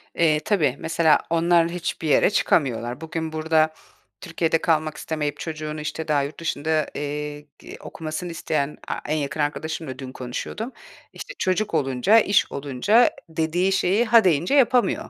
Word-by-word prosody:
Eee, 155 -2 +3
tabii, 155 - +2
mesela 160 -2 +3
onlar 170 0 +3
hiçbir 170 -2 -4
yere 150 - +4
çıkamıyorlar. 125 - 0
Bugün 160 0 -4
burada 155 0 +2 0.5
Türkiye'de 165 -1 0
kalmak 155 -2 0
istemeyip 150 -2 -3
çocuğunu 155 -1 -5
işte 160 +1 -5
daha 145 -2 +2
yurt 140 +2 -7
dışında, 160 -1 -1
eee, 150 0 -4 0.2
g - - -11
okumasını 160 +2 -6
isteyen 150 -3 -2
A - - -2 0.2
en 155 - +1
yakın 145 +1 -4
arkadaşımla 150 -2 -3
dün 130 -2 -7
konuşuyordum, 130 - -5 0.4
işte, - - -8
çocuk 185 +3 0
olunca, 135 - +3
iş 200 -2 +2
olunca, 145 - +2 0.2
dediği 165 +4 0
şeyi 195 +4 +2
ha 230 0 +6
deyince 175 - +2
yapamıyor, 255 -3 +2
160 Hz, 145 wpm, -23 LUFS, 150-175 Hz, 0.5 s, ha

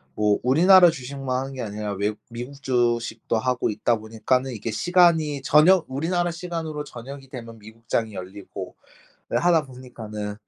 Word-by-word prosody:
뭐 105 -1 +2
우리나라 175 +7 +7
주식만 135 -3 -4
하는 135 +1 -5
게 130 - -6
아니라 105 -2 -4
외국 105 +2 -2
미국 125 +4 -8
주식도 120 -3 0
하고 125 +2 0
있다 115 +2 +1
보니까는 115 +4 -1
이게 115 -1 -5
시간이 160 - +3
저녁 160 +6 +5
우리나라 175 +6 -1
시간으로 165 -3 -5
저녁이 135 +1 -10
되면 115 -3 -9
미국장이 110 +1 -4
열리고 95 +2 -8 0.5
하다 170 -4 +2
보니까는 110 -5 -7
130 Hz, 355 characters per minute, -24 LUFS, 110-150 Hz, 0.5 s, 우리나라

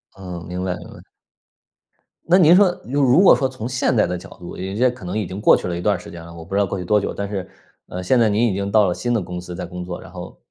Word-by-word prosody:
嗯， 90 -3 -8
明 90 +1 -4
白 90 -1 -1
明 - - -11
白。 - - -13 1.3
那 175 +2 +5
您 175 -2 +7
说 185 -2 +4
如 140 +4 -1
如 135 +5 +5
果 195 - +7
说 135 - 0
从 130 -3 -6
现 125 0 0
在 110 - +4
的 90 - -3
角 90 - -12
度， 85 -1 -9
有 - - -5
一 100 - -5
些 125 +2 +4
可 120 -6 -9
能 90 - -3
已 110 - -1
经 95 +2 -7
过 105 - +6
去 - - -4
了 85 -1 -3
一 - - -5
段 - - +2
儿 - - -6
时 - - -11
间 85 -1 -9
了， 85 0 -11
我 85 -1 -10
不 85 - -10
知 - - +3
道 100 - +3
过 100 - -4
去 90 - -5
多 105 +4 +3
久， - - -3
但 100 - -4
是， 95 -2 -5 0.4
呃， 90 0 -6
现 120 +7 +3
在 115 - +4
您 110 +4 +2
已 105 - 0
经 100 +1 -3
到 110 -1 +5
了 90 - 0
新 120 +6 -2
的 115 - +1
公 90 0 -6
司 90 0 -8
在 - - -5
工 90 0 -7
作， 90 -1 -6
然 - - -13
后 - - -9
100 Hz, 350 characters per minute, -21 LUFS, 90-120 Hz, 1.3 s, 您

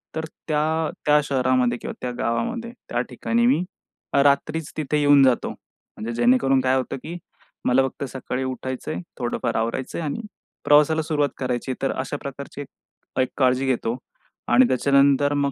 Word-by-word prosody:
तर 160 0 -2 0.2
त्या, 155 +1 +1 0.2
त्या 150 0 +5
शहरामध्ये 130 -3 +1
किंवा - - -6
त्या 125 - -2
गावामध्ये 235 - -2 0.2
त्या - - 0
ठिकाणी 235 +1 0
मी 250 -9 +3 0.6
रात्रीच 145 +2 +1
तिथे 150 -1 0
येऊन 145 -1 +6
जातो. 130 -2 +3
म्हणजे 115 +2 -10
जेणेकरून 130 +3 +3
काय 130 0 +2
होतं 130 0 -2
की 170 +2 -6 0.5
मला 125 +2 +4
फक्त 135 - -7
सकाळी 130 0 -4
उठायचंय, 130 +3 -4 0.2
थोडंफार 120 -1 -2
आवरायचंय 115 +7 -2
आणि 155 +8 -3 0.4
प्रवासाला 150 +2 +5
सुरुवात 150 -3 0
करायची 130 0 -2
आहे - - -3
तर 135 - +1
अशा 145 - -3
प्रकारची 140 +1 -7 0.7
काळजी 130 0 +3
घेतो. 125 -2 0 0.5
आणि 120 +1 +5
त्याच्यानंतर 140 +2 +3
मग 140 -1 +1
140 Hz, 145 wpm, -23 LUFS, 130-150 Hz, 0.7 s, येऊन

